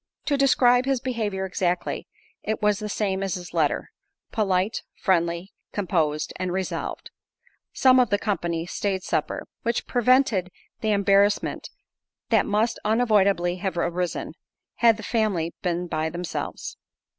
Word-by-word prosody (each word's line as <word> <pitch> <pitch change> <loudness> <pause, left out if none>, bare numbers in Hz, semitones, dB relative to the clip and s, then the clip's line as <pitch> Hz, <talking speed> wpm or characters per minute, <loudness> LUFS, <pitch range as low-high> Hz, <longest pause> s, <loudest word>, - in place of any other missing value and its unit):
To 295 - +2
describe 255 -2 +4
his 270 -2 +1
behaviour 220 -7 -2
exactly, 180 -1 -1 0.3
it 220 - -2
was 210 -1 +2
the 210 -1 -4
same 195 -2 -1
as 195 -2 -1
his 180 -1 -8
letter, - - 0 0.4
polite, 195 -1 +1
friendly, 170 0 0 0.2
composed, 160 -6 0
and 185 -1 -2
resolved. 190 +1 -4 0.6
Some 260 -1 +5
of 250 - +3
the 205 - +3
company 170 -6 -2
staid 190 +1 -2
supper, - - -1 0.2
which 235 0 -1
prevented 245 -6 +3 0.3
the 220 - -1
embarrassment 200 0 +2 0.6
that - - +3
must 220 +3 +1
unavoidably 200 -5 +2
have 185 -1 -3
arisen, 175 +1 -2 0.4
had 230 -2 +5
the 220 - -9
family 200 -8 0
been 175 0 -1
by 160 -2 -1
themselves. 175 +1 -5
200 Hz, 135 wpm, -25 LUFS, 180-220 Hz, 0.6 s, Some